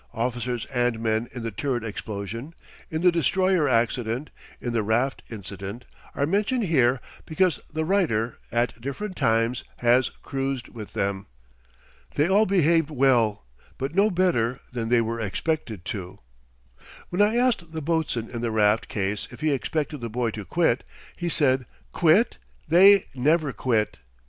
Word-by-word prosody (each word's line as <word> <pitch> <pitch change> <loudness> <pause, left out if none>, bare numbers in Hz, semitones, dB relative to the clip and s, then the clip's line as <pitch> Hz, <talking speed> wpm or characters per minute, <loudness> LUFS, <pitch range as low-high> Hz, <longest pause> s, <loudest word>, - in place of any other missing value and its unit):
Officers 120 0 -2
and 120 -2 +1
men 110 +1 0
in 120 - -7
the 115 - -3
turret 120 +2 -2
explosion, 110 - -6 0.3
in 160 +1 -3
the 180 - +6
destroyer 175 -1 +2
accident, 120 +2 0 0.3
in 120 - -3
the 115 - +2
raft 120 +6 0
incident, 100 +1 -7 0.3
are 140 - +1
mentioned 210 - +1
here 130 -8 +3 0.3
because 170 +1 +2
the 155 +1 -2
writer, 155 - +1
at 120 0 -1
different 185 - -5
times, 115 +2 +1
has 120 +2 +3
cruised 135 -2 -3
with 110 -4 -9
them. 100 0 -2 0.9
They 150 - +3
all 205 +4 +4
behaved 165 -4 +3
well; 125 - +2 0.3
but 135 +3 -3
no 200 +4 +4
better 150 - +1
than 115 -2 -2
they 120 -1 +4
were 115 +1 -2
expected 110 - -2
to. 95 -3 -7 0.9
When 180 +3 0
I 210 +2 +4
asked 240 -10 +1
the 160 - -4
boatswain 155 -7 -1
in 120 - -4
the 120 - 0
raft 110 0 +2
case 100 0 -2
if 120 - -12
he 155 0 +2
expected 150 +1 -2
the 115 - -4
boy 115 0 -1
to 105 -2 -7
quit, 160 - +1 0.3
he 175 - -3
said: 130 -6 +2 0.2
"Quit! 180 +8 +3 0.3
They 190 +4 +7
never 145 +2 +2
quit." 110 - 0
125 Hz, 155 wpm, -25 LUFS, 115-160 Hz, 0.9 s, They